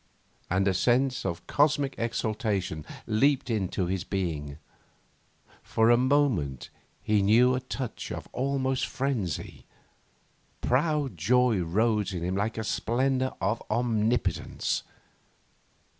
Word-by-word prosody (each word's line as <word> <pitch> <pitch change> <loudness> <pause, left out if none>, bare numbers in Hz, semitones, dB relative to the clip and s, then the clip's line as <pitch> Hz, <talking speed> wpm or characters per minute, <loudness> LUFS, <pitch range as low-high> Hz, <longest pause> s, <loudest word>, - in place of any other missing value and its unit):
And 95 +3 +2
a 95 - +3
sense 125 +3 +1
of 85 -1 -4
cosmic 145 -2 +2
exultation 105 -8 -2 0.2
leaped 130 +3 +2
into 95 -4 -1
his 95 +1 -2
being. 75 -7 -3 1.0
For 115 +1 +2
a - - +7
moment 125 - +1 0.3
he 105 -1 +2
knew 115 +6 +5
a 130 - 0
touch 130 -1 -5
of - - -6
almost 135 0 0
frenzy. 125 - -3 1.0
Proud 140 - 0
joy 120 +5 +3
rose 105 +4 +1
in 85 - -3
him 90 +2 -1
like 105 +4 -1
a 110 - -2
splendour 130 +5 0
of 115 - 0
omnipotence. 115 0 0
115 Hz, 115 wpm, -28 LUFS, 95-130 Hz, 1.0 s, a